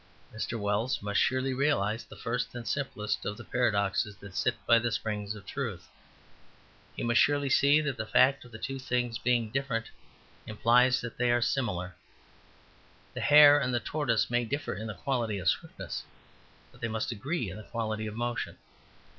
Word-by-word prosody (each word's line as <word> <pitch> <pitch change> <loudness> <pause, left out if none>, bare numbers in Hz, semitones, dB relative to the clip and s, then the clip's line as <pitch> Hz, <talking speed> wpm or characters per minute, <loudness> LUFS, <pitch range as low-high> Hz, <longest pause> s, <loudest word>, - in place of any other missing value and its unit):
Mr. 115 +1 -3
Wells 105 +4 -1
must 105 0 0
surely 130 +1 +1
realize 125 -6 +1
the - - -13
first 120 +1 -3
and 120 -2 -6
simplest 120 -5 -2
of 105 - -4
the 120 - -9
paradoxes 105 -4 0
that 100 -2 -12
sit - - +1
by 115 - +6
the 120 0 -1
springs 105 -2 -3
of 105 - -12
truth. 110 -11 -5 1.1
He - - -4
must 120 0 +3
surely 145 -2 +2
see 145 +3 +5
that 140 -4 -2
the 110 - -4
fact 130 +5 +4
of 120 -2 -11
two 135 +2 -4
things 125 -3 -1
being 120 -3 +1
different 125 -3 -2 0.6
implies 125 +4 +3
that 115 -1 -7
they 125 -1 +2
are 120 0 +3
similar. 95 -8 -1 1.2
The - - -5
hare 145 0 +8
and 130 -2 -1
the - - +2
tortoise 120 -8 0
may 120 0 +1
differ 140 +6 -3
in 110 +2 -6
the 105 - -5
quality 115 -1 -1
of 90 - -4
swiftness, - - -3 0.7
but - - -20
they 115 - -1
must 110 +3 -2
agree 120 - -3
in 95 - -8
the - - -8
quality 110 -2 -2
of 105 - -6
motion. 120 0 -3
120 Hz, 180 wpm, -29 LUFS, 110-130 Hz, 1.2 s, hare